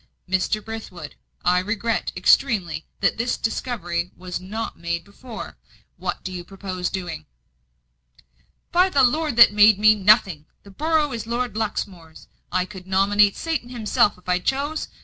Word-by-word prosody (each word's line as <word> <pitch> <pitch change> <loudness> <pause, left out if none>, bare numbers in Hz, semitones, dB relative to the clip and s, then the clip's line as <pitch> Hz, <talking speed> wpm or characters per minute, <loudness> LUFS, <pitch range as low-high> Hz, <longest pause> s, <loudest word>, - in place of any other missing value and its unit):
"Mr. 190 +3 0
Brithwood, 195 -9 -8 0.3
I 180 0 +4
regret 215 +4 -2
extremely 180 - +2
that - - +1
this 240 +1 0
discovery 180 -8 -3
was 180 -1 -5
not 210 +5 -5
made 170 0 -3
before. 220 +3 -10 0.4
What - - -4
do 185 - -5
you 180 -1 -6
purpose 185 -1 -5
doing?" 175 - -6 1.4
"By 365 +2 +4
the 280 -7 +3
Lord 300 +2 +1
that 235 -3 +8
made 210 0 +6
me, 215 +1 +6
nothing! 195 -6 +3 0.2
The 200 - -14
borough 305 +4 +1
is 225 -2 -5
Lord 235 -2 -2
Luxmore's; 190 -7 -5 0.2
I 185 0 +1
could 190 -2 -11
nominate 200 +2 +3
Satan 320 -7 -3
himself 215 -4 +1
if 180 - -23
I 180 0 +2
chose. 280 +9 -2
205 Hz, 150 wpm, -23 LUFS, 180-235 Hz, 1.4 s, that